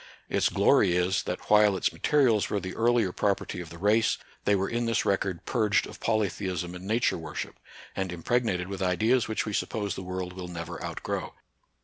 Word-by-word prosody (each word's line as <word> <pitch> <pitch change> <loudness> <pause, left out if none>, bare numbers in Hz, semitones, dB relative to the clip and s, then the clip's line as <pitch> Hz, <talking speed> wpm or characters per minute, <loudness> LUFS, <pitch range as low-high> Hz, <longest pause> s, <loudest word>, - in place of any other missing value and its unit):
Its - - +2
glory 85 - +4
is, 90 +1 +2
that - - -5
while 105 -2 +6
its - - 0
materials 125 -8 +2
were 105 - 0
the 95 0 -6
earlier 115 -4 +2
property 100 -2 -1
of 85 - -9
the 85 - -10
race, 105 +5 +3 0.3
they 100 - +4
were 95 0 0
in 120 0 -1
this 115 - +1
record 95 -3 0
purged 105 -4 +2
of - - -11
polytheism 95 -5 -1
and 90 +1 -8
Nature 110 -4 +1
worship, 80 -2 -6 0.4
and 95 -2 -2
impregnated 90 0 0
with 100 0 -6
ideas 110 +7 +2
which 110 - -1
we 105 - -4
suppose 100 0 -1
the - - -6
world 90 0 -4
will 90 -1 -7
never 85 -1 -6
outgrow. - - -4
95 Hz, 190 wpm, -28 LUFS, 90-110 Hz, 0.4 s, while